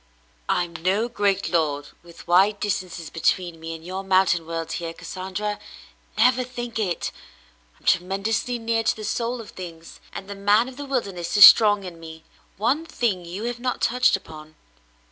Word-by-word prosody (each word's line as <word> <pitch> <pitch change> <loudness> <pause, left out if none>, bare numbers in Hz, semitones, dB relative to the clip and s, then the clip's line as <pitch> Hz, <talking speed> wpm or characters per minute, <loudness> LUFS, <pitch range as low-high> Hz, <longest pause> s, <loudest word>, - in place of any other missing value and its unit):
"I'm 175 -1 0
no 190 +7 +1
great 205 -4 0
lord 150 -4 0
with 170 0 -15
wide 195 +4 +4
distances 180 -6 -3
between 170 +1 0
me 165 0 -6
and 160 0 -12
your 190 +2 -5
mountain 185 -3 +2
world 165 0 -4
here, 165 -1 -4
Cassandra; 190 +4 -5 0.6
never 250 +3 +4
think 240 -2 -6
it. 185 -5 -2 0.7
I'm - - -26
tremendously 200 +7 0
near 225 0 0
to 225 - +1
the 215 - -8
soul 235 +3 -2
of 225 - -10
things, 165 -3 -10
and 195 - -8
the 200 - -6
man 205 +4 +3
of 260 - -9
the 285 - -6
wilderness 195 -9 -2
is 205 - +12
strong 205 -2 +7
in 175 -3 -9
me. 160 -1 -11 0.3
One 255 - +1
thing 230 - -2
you 180 +5 -6
have 240 0 -3
not 250 +1 -2
touched 250 0 +3
upon. 155 -4 -10
195 Hz, 170 wpm, -23 LUFS, 170-225 Hz, 0.7 s, is